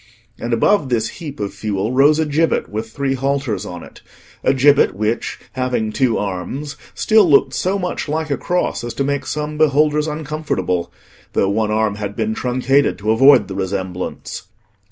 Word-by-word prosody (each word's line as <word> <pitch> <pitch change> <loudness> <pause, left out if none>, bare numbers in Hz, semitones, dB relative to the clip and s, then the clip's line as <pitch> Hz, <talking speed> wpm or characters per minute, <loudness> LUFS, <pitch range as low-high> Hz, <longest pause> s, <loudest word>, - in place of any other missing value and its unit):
And 120 - -4
above 135 - +2
this 115 -2 0
heap 150 -7 -7
of 100 -1 -3
fuel 100 +1 -2
rose 140 +4 +5
a 160 - +1
gibbet 155 +2 +1
with 110 +2 -4
three 135 +2 -2
halters 135 -6 -1
on 90 -1 -7
it; - - -14 0.4
a - - +4
gibbet 140 -3 +4
which, 110 +3 -2
having 125 -4 -1
two 125 -1 +1
arms, 105 - -4 0.2
still 215 -5 +4
looked 140 - +4
so 190 +2 0
much 180 -5 -3
like 155 0 -2
a 140 - +1
cross 180 -7 -1
as 120 -1 -5
to 140 - 0
make 140 0 -2
some 150 0 -3
beholders 150 0 +3
uncomfortable, 150 - -2 0.4
though 95 - +2
one 110 +1 0
arm 110 -1 0
had 105 -1 -5
been 220 - -1
truncated 130 - +1
to 105 +2 0
avoid 135 +3 +6
the 95 - -6
resemblance. 95 -1 -4
130 Hz, 175 wpm, -19 LUFS, 105-150 Hz, 0.4 s, avoid